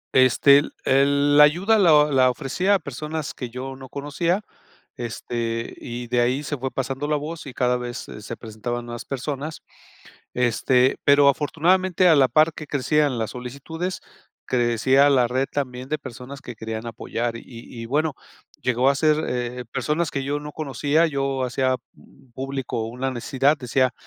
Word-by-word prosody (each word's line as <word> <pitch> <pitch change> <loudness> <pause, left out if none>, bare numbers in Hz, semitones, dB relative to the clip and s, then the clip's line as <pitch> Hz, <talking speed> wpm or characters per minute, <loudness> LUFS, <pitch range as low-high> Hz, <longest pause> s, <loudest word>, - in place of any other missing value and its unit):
este, 130 +2 +6 0.2
el 140 +2 +3
la 150 - +10
ayuda 185 +9 +4
la 155 -6 +6
la 130 -2 +4
ofrecía 160 +10 0
a 195 - +1
personas 150 +2 -5
que 125 -2 -6
yo 130 +2 -6
no 130 -1 -11
conocía, 165 - -1 0.5
este, 115 -1 -4
y 120 0 -6
de 120 0 +1
ahí 125 +4 +1
se 145 +1 -3
fue 130 +1 -4
pasando 135 +2 -3
la 150 - +2
voz 160 +3 -6
y 130 - -8
cada 125 0 +1
vez, 125 0 -4
se 105 - -9
se 115 +2 -7
presentaban 120 +2 -5
nuevas 120 -1 -6
personas. 140 +3 -5 0.7
Este, 125 +1 +2
pero 140 0 +6
afortunadamente 175 +5 +2
a 165 - +7
la 135 -3 +5
par 155 +3 +4
que 155 - -9
crecían 145 -2 +1
las 110 - -2
solicitudes, 140 +9 -5 0.4
crecían 130 +3 +3
la 125 -1 +4
red 130 +3 0
también 130 -2 -4
de 155 +1 -1
personas 130 0 -9
que 120 - -8
querían 110 +1 -6
apoyar 115 0 -3
y - - -9
y 115 -1 -9
bueno, 150 +3 0 0.5
llegó 125 +1 +2
a 140 - +4
ser 155 +2 +2
eh, 125 0 -3
personas 150 +5 -1
que 140 - -2
yo 145 +2 -1
no 150 0 -8
conocía, 150 +3 +1
yo 135 -2 -1
hacía, 130 +1 +1 0.2
mm, 135 -2 -22
público 135 -4 -3
una 125 +3 -3
necesidad, 135 +4 +1
decía: 130 0 +1
135 Hz, 170 wpm, -23 LUFS, 125-150 Hz, 0.7 s, la